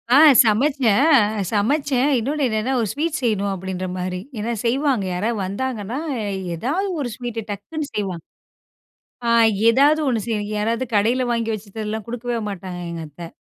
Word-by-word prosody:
ஆ, - - +8 0.2
சமச்சேன். 255 +2 +3 0.4
சமச்சேன். 275 +5 +1
இன்னொன்னு 280 +5 -1
என்னன்னா, 220 +4 -1
ஒரு 220 - 0
ஸ்வீட் 310 +5 -1
செய்யணும் 200 -4 0
அப்படின்ற 185 0 -4
மாரி. 180 0 -3 0.2
ஏனா, 230 +3 -2
செய்வாங்க 260 -3 +1
யாராவது 215 +5 -1
வந்தாங்கன்னா, 225 +2 -3 0.6
ஏதாவது 310 - -1
ஒரு 255 -4 -2
ஸ்வீட்ட 235 -3 -5
டக்குன்னு 290 +10 -5
செய்வாங்க. 190 -5 -3 1.1
ஆ - - +4 0.4
ஏதாது 285 +6 +4
ஒண்ணு 235 -3 +1
செய்ய, 225 -2 -1 0.2
யாராவது 230 +4 0
கடையில 235 +5 +2
வாங்கி 230 -1 -1
வச்சிட்டெல்லாம் 215 +1 -5
குடுக்கவே 240 0 -3
மாட்டாங்க 185 -2 -6
எங்கத்த. 165 +1 -8
225 Hz, 135 wpm, -21 LUFS, 200-260 Hz, 1.1 s, ஆ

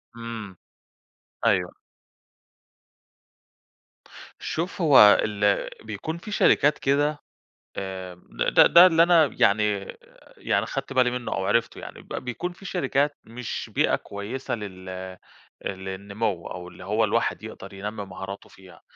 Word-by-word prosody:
إمم. 115 -5 -7 0.9
أيوه. - - +1 2.6
شوف 175 +3 -3
هو 150 -5 +6 0.3
ال 105 -1 +1
بيكون 110 +10 -5
في 210 +5 -9
شركات 150 -7 +4
كده 145 +2 +1 0.6
آآ 95 -2 -5 0.2
د - - -1
ده - - +8
ده 175 +1 +9
اللي 165 -1 +5
أنا 170 -3 +5
يعني، 100 0 +2 0.5
يعني - - 0
خَدت 135 - -5
بالي 125 -2 +3
منُّه 125 -1 -4
أو 95 - -2
عرِفته 115 - 0
يعني، - - -10
ب - - -22 0.2
بيكون 175 +9 -4
في 195 +2 -16
شركات 145 -2 0
مش 115 +1 -6
بيئة - - +3
كويسة 110 +7 -5
لل 95 -3 -8
آآ، 95 0 -7 0.5
للنمو 95 0 -4
أو 90 0 -7
اللي 90 - -13
هو 105 +3 +1
الواحد 105 - 0
يقدَر 95 +1 -9
ينمّي 100 +1 -5
مهاراته 95 +1 -8
فيها، 95 -1 -17
105 Hz, 130 wpm, -25 LUFS, 95-140 Hz, 2.6 s, ده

